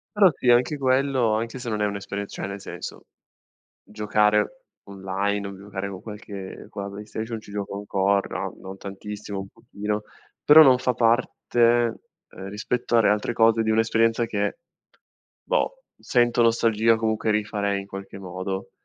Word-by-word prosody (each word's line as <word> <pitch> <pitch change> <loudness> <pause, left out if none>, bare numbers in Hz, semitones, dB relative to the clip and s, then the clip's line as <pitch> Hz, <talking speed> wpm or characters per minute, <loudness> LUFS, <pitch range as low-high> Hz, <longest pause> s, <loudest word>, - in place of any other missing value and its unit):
Però 200 -3 +7
sì, - - -4
anche 120 +5 +4
quello, 130 -3 +2
anche 115 +3 -2
se 125 -1 -5
non 105 -1 -2
è 105 - +2
un'esperienz 100 0 -5
cioè - - -5
nel 100 0 -6
senso - - -8 0.8
giocare 105 - +1 0.2
online, 100 +1 -2
o 100 -1 -7
giocare 100 0 -5
con 95 -2 -8
qualche 105 -3 -8
con 100 - -6
la 100 - -5
Play 105 +1 -8
Station, 110 +1 -5
ci 105 - -14
gioco 100 -1 -4
ancora, 100 0 0 0.2
no - - -16
non 95 +1 -8
tantissimo 100 +1 -7
un 95 0 -7
pochino, 105 +1 -4 0.4
però 155 +2 +10
non 130 -3 +6
fa 125 0 0
parte, 120 +1 0 0.7
ehm, 95 0 -9
rispetto 120 +4 -2
alle 115 -3 +5
altre 105 +3 0
cose 115 0 +4
di 110 - +1
un'esperienza 115 +1 +2
che, 105 +1 -2 0.9
boh, - - -1
sento 120 -1 +2
nostalgia, 115 -1 +3
comunque 110 0 0
rifarei 105 -1 0
in - - -13
qualche 95 0 -8
modo. 95 +1 -5
105 Hz, 160 wpm, -24 LUFS, 100-115 Hz, 0.9 s, però